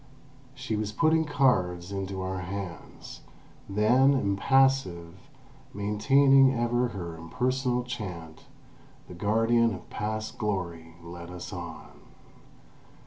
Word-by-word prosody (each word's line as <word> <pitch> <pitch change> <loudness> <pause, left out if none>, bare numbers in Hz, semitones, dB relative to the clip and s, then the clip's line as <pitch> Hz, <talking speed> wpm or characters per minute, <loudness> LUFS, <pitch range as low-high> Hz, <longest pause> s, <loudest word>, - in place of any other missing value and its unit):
She 115 - -3
was 105 -1 -2
putting 160 +5 +2
cards 90 - +1
into 95 -1 -4
our 95 0 -3
hands; 90 -1 -8 0.5
then, 120 +7 +4
impassive, 100 -5 +2 0.6
maintaining 135 +6 +4
ever 120 +1 +1
her 90 -7 -6
impersonal 125 +9 -1
chant, 90 -10 -7 0.6
the - - -10
guardian 115 +4 +2
of 90 - -13
past 110 +1 -4
glory 85 -6 -3
led 85 0 -9
us 90 -1 -8
on. - - -9
105 Hz, 100 wpm, -27 LUFS, 90-125 Hz, 0.6 s, then